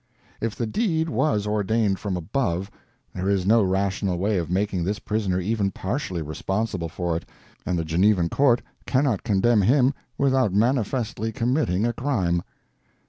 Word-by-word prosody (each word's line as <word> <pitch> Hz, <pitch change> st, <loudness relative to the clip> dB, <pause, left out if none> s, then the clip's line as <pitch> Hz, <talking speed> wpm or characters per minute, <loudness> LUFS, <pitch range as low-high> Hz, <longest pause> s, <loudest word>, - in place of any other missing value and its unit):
If 115 Hz, -1 st, -2 dB
the 120 Hz, -, -2 dB
deed 160 Hz, -, 0 dB
was 105 Hz, -11 st, +1 dB
ordained 105 Hz, -1 st, +1 dB
from 100 Hz, -3 st, -2 dB
above, 90 Hz, 0 st, -2 dB, 0.4 s
there 95 Hz, +1 st, -2 dB
is 95 Hz, -2 st, +1 dB
no 115 Hz, +3 st, +5 dB
rational 95 Hz, -1 st, 0 dB
way 100 Hz, +2 st, +1 dB
of 85 Hz, -, -4 dB
making 95 Hz, -1 st, 0 dB
this 100 Hz, +4 st, -1 dB
prisoner 105 Hz, -5 st, -1 dB
even 100 Hz, +1 st, 0 dB
partially 95 Hz, -, -3 dB
responsible 95 Hz, +3 st, -2 dB
for 85 Hz, 0 st, -2 dB
it, 80 Hz, -, -4 dB, 0.4 s
and 90 Hz, -, 0 dB
the 80 Hz, -, -1 dB
Genevan 90 Hz, +2 st, +2 dB
court 130 Hz, 0 st, +3 dB, 0.2 s
cannot 130 Hz, -5 st, +1 dB
condemn 105 Hz, +1 st, +3 dB
him 130 Hz, +6 st, +4 dB, 0.2 s
without 130 Hz, -7 st, +2 dB
manifestly 115 Hz, -1 st, 0 dB
committing 120 Hz, -, 0 dB
a 120 Hz, -, 0 dB
crime. 95 Hz, -12 st, 0 dB
105 Hz, 150 wpm, -24 LUFS, 95-120 Hz, 0.4 s, no